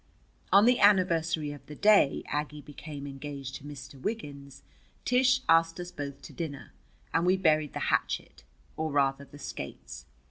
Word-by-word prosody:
On 200 Hz, +2 st, +7 dB
the 245 Hz, +1 st, +4 dB
anniversary 170 Hz, -6 st, +3 dB
of 145 Hz, -, -10 dB
the 150 Hz, -, -9 dB
day 205 Hz, -5 st, +4 dB
Aggie 150 Hz, 0 st, -4 dB
became 145 Hz, -1 st, -8 dB
engaged 140 Hz, -1 st, -7 dB
to -, -, -17 dB
Mr. 145 Hz, -2 st, -10 dB
Wiggins, 140 Hz, -10 st, -6 dB, 0.4 s
Tish 255 Hz, +1 st, +3 dB
asked 165 Hz, +1 st, +4 dB
us 175 Hz, 0 st, -6 dB
both 140 Hz, -3 st, -7 dB
to -, -, -10 dB
dinner, 150 Hz, -5 st, -6 dB, 0.4 s
and 165 Hz, -, +2 dB
we 185 Hz, +2 st, +3 dB
buried 155 Hz, -5 st, +2 dB
the -, -, -3 dB
hatchet, -, -, -1 dB, 0.3 s
or 160 Hz, 0 st, -2 dB
rather 140 Hz, 0 st, +1 dB
the 140 Hz, +2 st, -14 dB
skates. -, -, -8 dB
150 Hz, 155 wpm, -29 LUFS, 140-180 Hz, 0.4 s, On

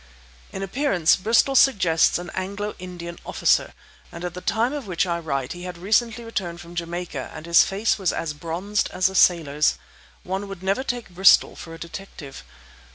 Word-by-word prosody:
In 195 Hz, -, -5 dB
appearance 195 Hz, -, +2 dB
Bristol 225 Hz, +7 st, +2 dB
suggests 185 Hz, -12 st, +4 dB
an 175 Hz, 0 st, -7 dB
Anglo 200 Hz, +2 st, -4 dB
Indian 175 Hz, -1 st, -8 dB
officer, -, -, +1 dB, 0.4 s
and 170 Hz, +1 st, -7 dB
at 175 Hz, -, -4 dB
the 180 Hz, -, -7 dB
time 230 Hz, +7 st, 0 dB
of 285 Hz, -7 st, -5 dB
which 180 Hz, 0 st, 0 dB
I 170 Hz, -1 st, -1 dB
write 135 Hz, -6 st, -3 dB
he 175 Hz, -, -10 dB
had 180 Hz, -1 st, -7 dB
recently 220 Hz, +5 st, +1 dB
returned 180 Hz, -7 st, -4 dB
from 175 Hz, 0 st, -11 dB
Jamaica 175 Hz, +1 st, -5 dB
and 155 Hz, 0 st, -8 dB
his 170 Hz, 0 st, +6 dB
face 205 Hz, +3 st, 0 dB
was 190 Hz, -3 st, +1 dB
as 165 Hz, -2 st, -3 dB
bronzed 175 Hz, +7 st, -2 dB
as 185 Hz, +1 st, +2 dB
a -, -, -9 dB
sailor's. 150 Hz, -5 st, +3 dB, 0.5 s
One 190 Hz, +2 st, -3 dB
would 195 Hz, -2 st, -9 dB
never 195 Hz, +6 st, +1 dB
take 245 Hz, -4 st, -4 dB
Bristol 185 Hz, +1 st, +5 dB
for 165 Hz, -1 st, -9 dB
a -, -, -10 dB
detective. 165 Hz, -, -9 dB
180 Hz, 180 wpm, -23 LUFS, 170-200 Hz, 0.5 s, his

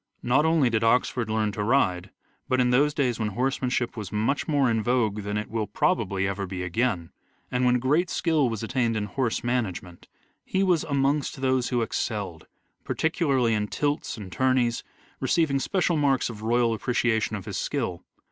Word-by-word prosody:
Not 135 Hz, +5 st, +3 dB
only 160 Hz, -6 st, +3 dB
did 110 Hz, -1 st, +1 dB
Oxford 120 Hz, 0 st, +2 dB
learn 110 Hz, -1 st, 0 dB
to 105 Hz, -, -4 dB
ride, 100 Hz, -6 st, +1 dB, 0.4 s
but, 130 Hz, -, +2 dB
in 125 Hz, -1 st, +3 dB
those 145 Hz, +4 st, +4 dB
days 130 Hz, -5 st, 0 dB
when 110 Hz, -, 0 dB
horsemanship 125 Hz, +2 st, -1 dB
was 105 Hz, -4 st, -6 dB
much 110 Hz, +7 st, 0 dB
more 145 Hz, -3 st, +2 dB
in 115 Hz, -2 st, +1 dB
vogue 110 Hz, -3 st, +1 dB
than 105 Hz, +1 st, -3 dB
it 105 Hz, -, -3 dB
will 110 Hz, -1 st, -2 dB
probably 100 Hz, -1 st, 0 dB
ever 100 Hz, 0 st, -3 dB
be 90 Hz, -1 st, -4 dB
again, 90 Hz, -2 st, -1 dB, 0.4 s
and 125 Hz, 0 st, +1 dB
when 125 Hz, 0 st, +4 dB
great 150 Hz, +8 st, +1 dB
skill 155 Hz, -6 st, +1 dB
was 115 Hz, -1 st, -4 dB
attained 115 Hz, -1 st, 0 dB
in 105 Hz, -, -1 dB
horse 115 Hz, +3 st, -2 dB
management, 105 Hz, -8 st, -3 dB, 0.4 s
he 190 Hz, -, 0 dB
was 180 Hz, -4 st, +2 dB
amongst 140 Hz, -1 st, 0 dB
those 130 Hz, -2 st, +1 dB
who 120 Hz, -2 st, +1 dB
excelled, 100 Hz, -7 st, -3 dB, 0.4 s
particularly 140 Hz, -8 st, +1 dB
in 105 Hz, -1 st, 0 dB
tilts 145 Hz, +2 st, -2 dB
and 100 Hz, -4 st, -8 dB
tourneys, 130 Hz, -2 st, +1 dB, 0.4 s
receiving 160 Hz, -6 st, +1 dB
special 175 Hz, +2 st, 0 dB
marks 135 Hz, -4 st, +1 dB
of 105 Hz, -2 st, -10 dB
royal 115 Hz, +1 st, +2 dB
appre 120 Hz, +3 st, -3 dB
ciation 110 Hz, -2 st, +1 dB
of 100 Hz, -, -9 dB
his 100 Hz, -3 st, -4 dB
skill. 95 Hz, -11 st, -3 dB
120 Hz, 180 wpm, -26 LUFS, 105-135 Hz, 0.4 s, those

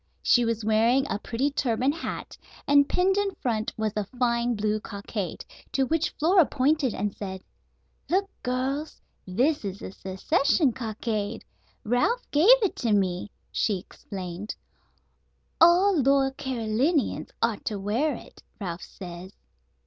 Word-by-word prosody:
She 245 Hz, -1 st, +4 dB
was 225 Hz, -2 st, -1 dB
wearing 230 Hz, +5 st, +3 dB
a 205 Hz, -, -1 dB
pretty 255 Hz, +6 st, -1 dB
turban 255 Hz, -1 st, +1 dB
hat, 330 Hz, -, -6 dB, 0.3 s
and 285 Hz, 0 st, +5 dB
pinned 380 Hz, +2 st, +2 dB
in 405 Hz, -1 st, 0 dB
front 220 Hz, -3 st, -1 dB
was 220 Hz, -1 st, -1 dB
a 210 Hz, -, 0 dB
fine 240 Hz, +2 st, 0 dB
blue 215 Hz, 0 st, 0 dB
cockade, 200 Hz, -2 st, -5 dB, 0.3 s
to 270 Hz, -, +2 dB
which 325 Hz, +4 st, +1 dB
Flora 350 Hz, +4 st, +5 dB
pointed 280 Hz, -2 st, +1 dB
and 205 Hz, 0 st, -2 dB
said: 190 Hz, -2 st, -6 dB, 0.7 s
"Look, 390 Hz, +3 st, +2 dB
girls. 265 Hz, +5 st, -2 dB, 0.3 s
This 255 Hz, +12 st, +1 dB
is 195 Hz, -1 st, -4 dB
the -, -, -8 dB
Secession 275 Hz, -, +1 dB
Cockade. 220 Hz, -3 st, -3 dB, 0.4 s
Ralph 245 Hz, -, +1 dB
gave 310 Hz, +8 st, +4 dB
it 400 Hz, -, +1 dB
to 230 Hz, -3 st, +1 dB
me," 185 Hz, -1 st, 0 dB, 0.2 s
she 205 Hz, -4 st, +1 dB
explained; 185 Hz, +1 st, -7 dB, 1.1 s
"all 360 Hz, +4 st, +6 dB
loyal 270 Hz, 0 st, +3 dB
Carolinians 265 Hz, +2 st, 0 dB
ought 230 Hz, -3 st, 0 dB
to 210 Hz, -, -2 dB
wear 235 Hz, +9 st, 0 dB
it, -, -, -13 dB, 0.2 s
Ralph 180 Hz, -4 st, -4 dB
says." 180 Hz, +1 st, -9 dB
235 Hz, 135 wpm, -26 LUFS, 210-285 Hz, 1.1 s, all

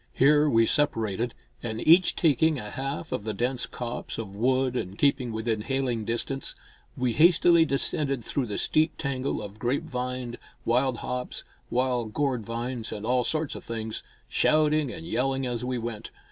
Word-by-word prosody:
Here 150 Hz, +2 st, +5 dB
we 115 Hz, -3 st, +4 dB
separated, 115 Hz, -5 st, 0 dB, 0.3 s
and 110 Hz, -2 st, -4 dB
each 175 Hz, +3 st, +6 dB
taking 160 Hz, 0 st, +3 dB
a 105 Hz, -4 st, -6 dB
half 135 Hz, +4 st, -4 dB
of -, -, -2 dB
the 110 Hz, -1 st, -3 dB
dense 125 Hz, +2 st, -1 dB
copse 120 Hz, 0 st, -5 dB
of 100 Hz, -4 st, -6 dB
wood 130 Hz, +3 st, +1 dB
and 95 Hz, -5 st, -3 dB
keeping 135 Hz, -4 st, +2 dB
within 110 Hz, 0 st, -1 dB
hailing 125 Hz, -2 st, -1 dB
distance, 120 Hz, +4 st, -2 dB, 0.4 s
we 125 Hz, -2 st, +1 dB
hastily 170 Hz, +1 st, +6 dB
descended 140 Hz, -3 st, 0 dB
through 135 Hz, -4 st, -1 dB
the 105 Hz, -, -3 dB
steep 155 Hz, +1 st, +1 dB
tangle 135 Hz, -2 st, -2 dB
of 105 Hz, +1 st, -9 dB
grapevine, 125 Hz, -2 st, -2 dB, 0.3 s
wild 125 Hz, +1 st, +2 dB
hops, 125 Hz, 0 st, -4 dB, 0.3 s
wild 125 Hz, -3 st, 0 dB
gourdvines 120 Hz, -3 st, -2 dB
and 105 Hz, 0 st, -5 dB
all 125 Hz, +1 st, +2 dB
sorts 155 Hz, +3 st, -1 dB
of -, -, -8 dB
things, 110 Hz, -1 st, -4 dB, 0.3 s
shouting 155 Hz, -3 st, +3 dB
and 165 Hz, +4 st, -7 dB
yelling 135 Hz, -3 st, 0 dB
as 120 Hz, -1 st, -2 dB
we 125 Hz, 0 st, -1 dB
went. 115 Hz, -2 st, -5 dB
125 Hz, 160 wpm, -27 LUFS, 115-140 Hz, 0.4 s, each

